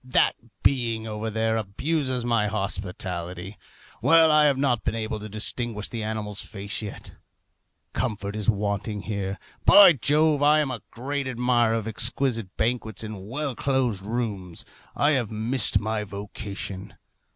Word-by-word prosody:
That 125 0 +3 0.3
being 115 -4 +1
over 110 0 -3
there 110 +1 0
abuses 130 +4 -1
my 115 -3 +2
hospitality. 95 -2 -3 0.5
Well, 160 +5 +6
I 150 0 +6
have 140 -2 +3
not 130 -4 +1
been 110 - -1
able 110 -1 -3
to 105 +1 -7
distinguish 110 +1 -2
the 115 - -4
animal's 105 -1 -3
face 100 +1 -4
yet. 105 -2 -8 0.8
Comfort 105 -4 -2
is 105 +1 0
wanting 105 0 -1
here. 100 -2 -3 0.3
By 200 -4 +9
Jove! 150 +3 +2
I 150 +1 +5
am 145 -3 0
a 120 -5 -5
great 140 +3 -3
admirer 120 -2 +2
of 110 -1 -2
exquisite 115 -1 0
banquets 115 -2 -1
in 105 -3 -7
well 140 +3 -3
closed 125 -6 0
rooms. 105 -6 -3 0.3
I 145 - +3
have 125 -7 +1
missed 115 +4 +1
my 110 0 -2
vocation. 100 -1 -7
110 Hz, 145 wpm, -25 LUFS, 105-130 Hz, 0.8 s, By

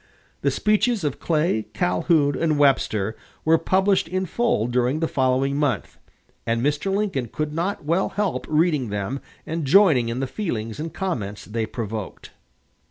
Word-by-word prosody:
The - - +2
speeches 215 0 +1
of 145 -3 -2
Clay, 155 -9 0
Calhoun, 145 - +2
and 160 -2 +1
Webster 110 -7 +2 0.3
were 160 +1 +5
published 190 +2 +2
in 185 +2 -1
full 210 - +1
during 125 +4 +1
the 165 - 0
following 130 0 +1
month, 145 -3 -1 0.4
and 115 0 0
Mr. 150 +7 0
Lincoln 195 - -1
could 150 +5 -3
not 170 0 -2
well 170 +5 +1
help 205 -2 -2
reading 150 -5 +2
them 105 +6 -3 0.3
and 165 0 -3
joining 140 - +5
in 120 +2 -3
the 135 - 0
feelings 120 - -4
and 160 +1 -4
comments 105 - -4
they 110 0 -3
provoked. 110 -4 -6
145 Hz, 155 wpm, -23 LUFS, 120-175 Hz, 0.4 s, were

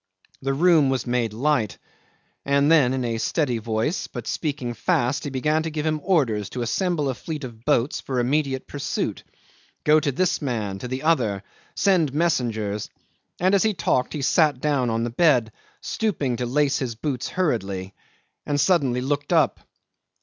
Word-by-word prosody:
The 135 0 -1
room 160 -3 +4
was 130 -3 -1
made 120 -3 0
light; 120 -2 0 0.7
and 140 +2 +3
then 145 -6 +5
in 130 -2 -2
a 115 -1 -2
steady 125 -3 0
voice, 110 - -1
but - - -7
speaking 140 -6 -3
fast, 125 +4 0
he - - -2
began 150 +4 0
to 160 - -3
give 155 -1 -3
him 155 -1 0
orders 120 - +1
to 125 - -4
assemble 170 - 0
a 135 - 0
fleet 150 +3 -6
of 115 -3 -9
boats 120 +5 +1
for 130 -2 -2
immediate 135 +1 0
pursuit, 140 -1 -3 0.6
go 155 +1 +5
to 145 -1 0
this 185 +7 0
man, 110 -8 -2
to 125 - -5
the 130 +2 -4
other 115 -12 +1 0.3
send 170 -8 +2
messengers; 115 -10 0 0.5
and 185 +2 +2
as 200 - +4
he 215 -2 +1
talked 125 -6 0
he 150 -3 -3
sat 150 -2 +3
down 140 -4 +1
on 115 0 0
the 120 - -2
bed, 125 -5 +3 0.3
stooping 145 - -1
to 125 0 -2
lace 140 +2 +1
his 125 -4 -3
boots 130 +1 -3
hurriedly, 100 - -2 0.5
and 145 -1 -1
suddenly 140 -6 +2
looked 145 +3 -2
up. 160 -5 +3
135 Hz, 170 wpm, -24 LUFS, 120-155 Hz, 0.7 s, then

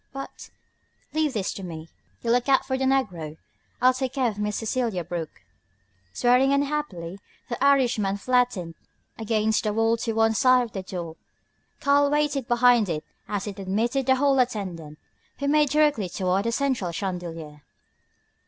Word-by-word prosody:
"But 275 0 -8 0.3
" - - -40
"Leave 310 -2 +1
this 205 -5 -2
to - - -8
me. 165 -2 -7 0.4
You 230 - +1
look 245 +3 +2
out 270 - +4
for 260 0 -1
the 265 0 -1
negro. 180 - -1 0.5
I'll 255 0 +6
take 260 0 -3
care 265 -3 +1
of 210 -1 -7
Miss 210 0 -1
Cecelia 225 -5 -1
Brooke." 165 -2 -6 0.7
Swearing 250 +2 +3
unhappily, 280 - -2 0.3
the 240 +2 -3
Irishman 245 -8 +3
flattened 240 -7 0 0.5
against 220 -1 +1
the 210 -1 0
wall 225 +1 +2
to 225 0 -2
one 225 0 +3
side 255 +2 +4
of 235 - -7
the 195 - -4
door. 175 -3 -6 0.6
Karl 285 0 +4
waited 295 -3 0
behind 240 -4 +4
it 155 -2 -2 0.2
as 205 -2 -3
it 200 -2 -6
admitted 230 +8 -1
the 260 - +5
hall 275 0 +2
attendant, 185 -11 -2 0.4
who 280 - -2
made 300 0 +3
directly 295 -9 +2
toward 185 +2 0
the 230 - +1
central 250 -8 0
chandelier. 165 -5 -5
230 Hz, 160 wpm, -25 LUFS, 190-265 Hz, 0.7 s, I'll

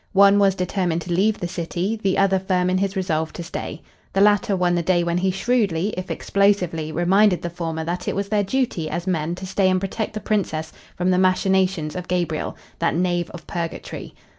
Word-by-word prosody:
One 200 +1 +6
was 195 -2 +4
determined 180 -2 -1
to 175 - -7
leave 205 +5 +2
the 175 - -2
city, 175 +4 -2
the 195 -2 +1
other 195 -1 +3
firm 185 -1 +1
in 185 - +2
his 195 0 -1
resolve 160 -4 -1
to 170 - -6
stay. 165 -2 -6 0.3
The 195 - +2
latter 205 -1 +4
won 180 -1 +2
the 175 - +1
day 175 0 +2
when 170 +1 0
he 190 +1 +1
shrewdly, 195 -3 +1
if 185 0 -5
explosively, 180 -3 +1
reminded 185 +3 +3
the 175 - -3
former 165 -2 -3
that 180 +2 -3
it - - -1
was 200 0 -1
their 210 -1 +2
duty 195 -7 -1
as 170 +2 -3
men 170 -2 -1
to 190 - -7
stay 190 0 +2
and 185 0 +2
protect 210 +3 -3
the - - -2
Princess 175 -7 -2 0.2
from 180 +1 +1
the 180 - +3
machinations 185 -3 +2
of 180 -1 -5
Gabriel, 175 -2 -2 0.2
that - - +1
knave 175 0 0
of 175 - -10
purgatory. 170 -1 -5
185 Hz, 210 wpm, -22 LUFS, 170-195 Hz, 0.3 s, One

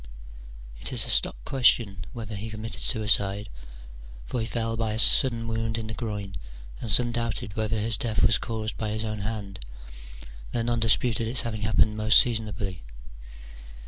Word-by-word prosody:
It - - -1
is - - +2
a - - +1
stock - - +1
question 115 -8 +2
whether 110 -2 -8
he 105 +3 -7
committed 110 +1 -5
suicide: 105 -3 +2 0.8
for 125 - -4
he 110 - -3
fell 115 -1 -3
by 110 -1 -2
a - - -4
sudden 115 0 +5
wound 115 0 -3
in 115 - -5
the 110 - -7
groin, 105 -4 -6 0.4
and 115 - -4
some 120 +3 +7
doubted 115 -3 -3
whether 110 0 -2
his 110 0 -1
death 110 -4 -2
was 105 - +3
caused 110 -1 -5
by 110 - -3
his 110 +1 -3
own 110 -1 -5
hand, 100 -2 -6 0.9
though 115 - -1
none 120 0 -1
disputed 115 0 +1
its 125 +2 +2
having 110 -3 -5
happened 105 0 +1
most 110 0 +5
seasonably. 105 -6 -1
110 Hz, 170 wpm, -25 LUFS, 105-115 Hz, 0.9 s, some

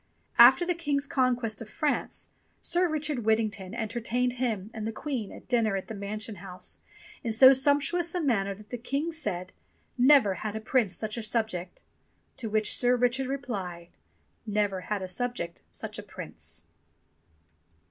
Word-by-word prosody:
After 260 +9 +9
the 355 - +1
King's 290 -4 0
conquest 245 -6 0
of 220 - -8
France, 295 +6 -2 0.3
Sir 350 +1 +2
Richard 300 -3 0
Whit 220 -1 +3
tington 210 -2 -3
entertained 240 +2 -1
him 225 -5 -2
and 220 -1 -4
the - - -2
Queen 245 -3 -4
at - - -12
dinner 230 -5 +2
at 190 - -4
the - - -4
Mansion 210 +1 -5
House 185 0 -7 0.4
in 230 - -1
so 260 +4 +9
sumptuous 290 +6 +1
a - - +1
manner 200 - +1
that 210 +1 -16
the 245 - -4
King 280 +7 -2
said, 195 - -2 0.5
"Never 255 -6 +6
had 220 0 -4
Prince 225 -7 +2
such 215 +1 -3
a - - -2
subject!" 215 -5 -2 0.5
To 225 - -3
which 215 0 +2
Sir 245 0 +3
Richard 250 +2 +2
replied, 195 -11 -4 0.6
"Never 205 -3 0
had 195 0 -3
subject 185 -3 -3
such - - -6
a - - -7
Prince." - - -7
230 Hz, 160 wpm, -28 LUFS, 210-265 Hz, 0.6 s, After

